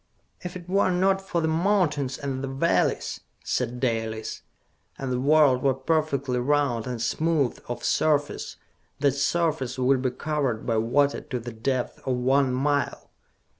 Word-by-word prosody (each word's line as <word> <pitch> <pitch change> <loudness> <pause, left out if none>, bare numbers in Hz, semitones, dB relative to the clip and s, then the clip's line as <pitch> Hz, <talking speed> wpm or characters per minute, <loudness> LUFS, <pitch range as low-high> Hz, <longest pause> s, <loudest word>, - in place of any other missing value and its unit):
"If 180 0 -6
it 175 -1 -12
were 195 +1 +2
not 190 +2 +2
for 175 -3 -2
the 160 - +1
mountains 160 -6 +1
and 135 -1 -4
the - - -2
valleys," 135 +6 0 0.2
said 125 0 -2
Dalis, 110 -3 -2 0.6
"and 135 -1 -4
the 125 - 0
world 140 -2 +4
were 135 -1 +2
perfectly 140 -3 0
round 130 -3 +1
and 125 -2 -4
smooth 150 +3 0
of 120 - -5
surface, 145 -2 0 0.4
that 140 -1 +3
surface 140 -2 0
would 130 +1 +2
be 130 - +1
covered 135 -4 -2
by 115 -2 +1
water 140 +6 +2
to 125 - -4
the 120 0 -7
depth 125 +3 -2
of 130 - +1
one 130 +2 +2
mile! 140 +2 -1
135 Hz, 155 wpm, -26 LUFS, 125-155 Hz, 0.6 s, world